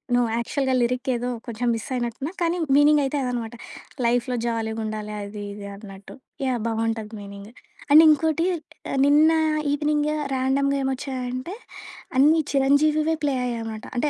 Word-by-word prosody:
No. 245 - +4 0.2
యాక్చువల్‌గా 265 +2 -1
lyric 250 +2 -1
ఏదో 245 +1 -3 0.2
కొంచెం 235 +1 -3
మిస్ 225 - -6
అయినట్టున్నా. 245 +6 -3
కానీ 340 +1 +1 0.2
మీనింగైతే 290 -1 +4
అదనమాట. 240 -2 -3 0.5
లైఫ్‌లో 245 +1 +1
జాలీగుండాలి 220 -2 -3
అది 205 0 -7
ఇది 200 0 -8
అన్నట్టు. 200 -1 -12 0.3
యాహ్! 250 -2 0
బావుంటది 225 -1 -2
మీనింగు. 200 +1 -10 0.4
అండ్ 310 +2 +9
ఇంకోటి 315 +2 +3 0.6
నిన్న 300 +3 +5 0.4
ఈవెనింగు 300 +1 0 0.2
ర్యాండమ్‌గా 275 +2 +1
ఏమొచ్చాయంటే 260 +2 -3 0.6
అన్నీ 305 +4 +5
'చిరంజీవివే' 300 +3 +3
ప్లే 285 - +1
అయ్యాయనమాట. 225 -2 -4
అంటే 295 +5 +1
255 Hz, 125 wpm, -24 LUFS, 225-290 Hz, 0.6 s, అండ్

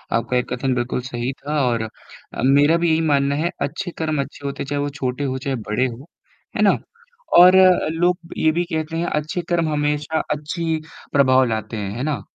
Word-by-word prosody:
आपका 115 +2 -1
ये 125 - +2
कथन 130 +1 -1
बिल्कुल 125 +1 -1
सही 120 0 -3
था 150 +1 -2
और 115 -2 0
अ, 110 - -10
मेरा 145 +4 +5
भी 170 0 +1
यही 160 0 +2
मानना 140 -1 +2
है 160 +3 0
अच्छे 175 +5 -3
कर्म 155 -3 0
अच्छे 140 - -9
होते 140 - -3
हैं 140 - -10
चाहे 145 0 -2
वो 145 - -1
छोटे 135 -1 -3
हो 130 -2 -1
चाहे 135 0 -3
बड़े 110 +5 +1
हो, 125 +3 -9 0.5
है - - 0
ना? - - +4 0.6
और 180 +1 +9
अ, 185 -1 +5
लोग 175 +2 +1 0.2
ये 160 - +3
भी 170 +2 0
कहते 160 +1 -2
हैं 170 - -1 0.2
अच्छे 155 +4 -4
कर्म 170 -2 +1
हमेशा 150 +1 0 0.2
अच्छी 160 +2 -2 0.4
प्रभाव 130 -2 +5
लाते 110 0 -3
हैं। 100 -2 -4
है 125 - -3
ना? 150 -2 -2
145 Hz, 210 wpm, -21 LUFS, 130-160 Hz, 0.6 s, और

